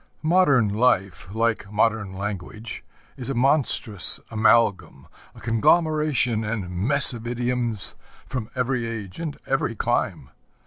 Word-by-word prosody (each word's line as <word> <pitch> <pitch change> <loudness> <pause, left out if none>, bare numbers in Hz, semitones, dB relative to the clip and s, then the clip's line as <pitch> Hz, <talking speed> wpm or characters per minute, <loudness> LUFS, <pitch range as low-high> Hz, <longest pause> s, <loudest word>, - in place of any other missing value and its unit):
Modern 155 - +4
life, 100 -6 +1
like 110 -1 -1
modern 105 -2 0
language, 100 +3 -6 0.3
is 125 - -5
a 135 - -2
monstrous 125 - +3
amalgam, 105 -10 +2 0.3
a - - -13
conglomeration 135 -1 +2
and 105 -4 -4
mess 125 +11 +2
of 120 0 -7
idioms 120 -5 -2 0.3
from 125 -4 -5
every 125 -2 -1
age 105 - -7
and 160 -4 -5
every 135 -3 -1
clime. - - -2
115 Hz, 120 wpm, -24 LUFS, 105-130 Hz, 0.3 s, Modern